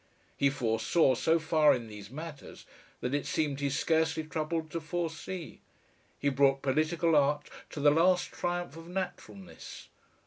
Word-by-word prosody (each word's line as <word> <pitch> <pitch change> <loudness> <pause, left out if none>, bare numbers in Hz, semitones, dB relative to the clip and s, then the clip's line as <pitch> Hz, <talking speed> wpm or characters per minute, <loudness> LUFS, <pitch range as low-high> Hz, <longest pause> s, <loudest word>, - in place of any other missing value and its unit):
He 140 - +3
foresaw 130 +3 +2
so 160 +7 +2
far 160 -2 +4
in 120 -2 -5
these 105 -2 -10
matters 150 +2 -9 0.4
that 125 - -2
it 145 - -1
seemed 145 -3 -1
he 140 0 0
scarcely 160 +3 +1
troubled 160 0 -3
to 165 - -3
foresee. 165 +1 -5 0.6
He 140 - +1
brought 135 0 +3
political 155 +4 +2
art 145 0 +2 0.2
to - - -7
the 145 0 +5
last 175 +4 +3
triumph 175 -3 -3
of 165 0 -10
naturalness. 185 +1 -7
155 Hz, 145 wpm, -30 LUFS, 140-165 Hz, 0.6 s, the